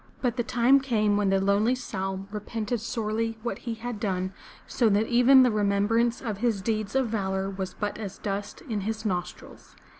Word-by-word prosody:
But 245 -3 0
the 245 - 0
time 245 +4 +4
came 215 -6 +1
when 205 -1 +2
the 195 0 +3
lonely 200 +5 +2
Saum 195 -5 -4
repented 215 +2 -3
sorely 225 0 -2
what 240 - -3
he 230 -2 -4
had 230 -1 -5
done, 190 -2 -2 0.3
so 235 -3 +2
that 205 +2 +3
even 250 +3 +6
the 250 - +3
remembrance 215 +3 +1
of 215 -5 -3
his 230 -3 +1
deeds 215 0 -2
of 265 -2 +2
valor 195 -2 -1
was 190 -1 -5
but 205 0 -3
as 200 -3 -6
dust 200 0 -4
in 220 -7 -3
his 220 +2 -4
nostrils. 180 -4 -5
215 Hz, 185 wpm, -27 LUFS, 200-235 Hz, 0.3 s, even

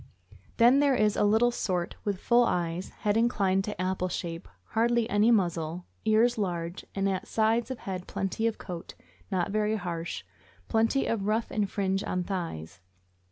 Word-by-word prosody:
Then 245 +3 +6
there 285 -2 +4
is 215 -3 +2
a - - +2
little 220 +4 +4
sort 180 -6 -2
with 200 -3 -2
full 240 +3 +4
eyes, 175 -4 -1
head 205 0 -1
inclined 200 -5 +2
to 210 -4 -5
apple 185 0 -1
shape, 170 -1 -5 0.2
hardly 235 0 +2
any 205 +3 +4
muzzle, 175 -5 +1 0.2
ears 220 +2 +3
large, 175 -3 -3
and 195 0 +1
at 190 -1 -2
sides 225 +2 +1
of 260 - -4
head 185 -4 -6
plenty 195 +4 -1
of 225 - -2
coat, 175 -3 -8 0.4
not 185 +1 0
very 215 +1 +1
harsh, 170 -4 -4 0.4
plenty 225 - +2
of 205 -3 -1
ruff 220 +2 0
and 205 -2 0
fringe 195 -1 -1
on 180 0 -1
thighs. 165 - -5
200 Hz, 165 wpm, -28 LUFS, 180-225 Hz, 0.4 s, Then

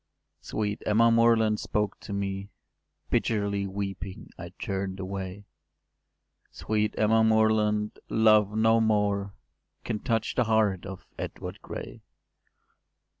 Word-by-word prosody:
” - - -52
Sweet 105 -1 -3
Emma 115 +2 +4
Moreland 115 -2 +4
spoke 105 -1 -2
to - - -9
me: 100 0 -3 0.6
Bitterly 100 -2 0
weeping 95 -1 -6
I - - -8
turn’d 95 -1 -3
away: 95 +1 -5 1.0
“Sweet 105 0 -1
Emma 110 +1 +4
Moreland, 110 -1 +2
love 110 -2 +4
no 110 +1 +4
more 100 -2 +1 0.5
Can 105 - -3
touch 115 -1 -1
the 125 - +1
heart 105 -4 +1
of 95 -3 -8
Edward - - -6
Gray. - - -8
105 Hz, 115 wpm, -27 LUFS, 100-110 Hz, 1.0 s, Emma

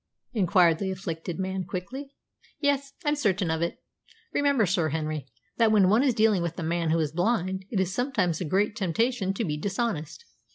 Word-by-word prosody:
inquired 180 -6 +4
the 195 - -1
afflicted 175 -3 -4
man 190 0 -2
quickly. 260 - -6 0.4
"Yes, 280 -1 0
I'm 295 - +3
certain 200 - +1
of 160 0 -1
it. 170 - -3 0.5
Remember, 280 -6 +3
Sir 175 -3 +1
Henry, 155 -2 -3 0.3
that 225 -2 +4
when 200 -4 +5
one 215 +5 +5
is 265 -4 +2
dealing 215 -4 +3
with 170 -1 -3
a 175 - -3
man 165 0 0
who 165 - +3
is 155 -3 0
blind, 190 +1 0
it 210 - -1
is 190 0 0
sometimes 205 - 0
a - - -1
great 200 +6 +1
temptation 210 +2 0
to 225 - -1
be 150 -3 -2
dishonest." 195 - -3
190 Hz, 190 wpm, -27 LUFS, 170-230 Hz, 0.5 s, when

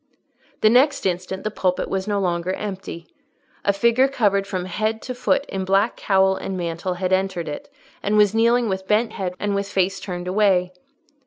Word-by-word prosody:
The 215 - +6
next 270 +5 +3
instant 185 +1 -2
the 215 - -2
pulpit 185 -3 -1
was 190 +1 -3
no 205 -1 0
longer 175 -1 -1
empty. 190 -4 -6 0.6
A 200 - +3
figure 235 +6 +3
covered 205 -7 +1
from 185 -3 -3
head 215 +4 -1
to 255 - -4
foot 250 +3 0
in 195 -7 -4
black 195 +4 +2
cowl 190 -1 +2
and 190 0 -4
mantle 170 +1 -3
had 185 +1 -1
entered 185 -3 0
it, 285 - -7 0.3
and 210 +1 +1
was 210 -1 +5
kneeling 235 +1 +3
with 190 -1 -3
bent 215 +2 +2
head 180 -2 -4
and 205 -1 -1
with 200 0 -2
face 190 0 0
turned 180 -2 -6
away. 185 -2 +2
195 Hz, 185 wpm, -22 LUFS, 185-215 Hz, 0.6 s, The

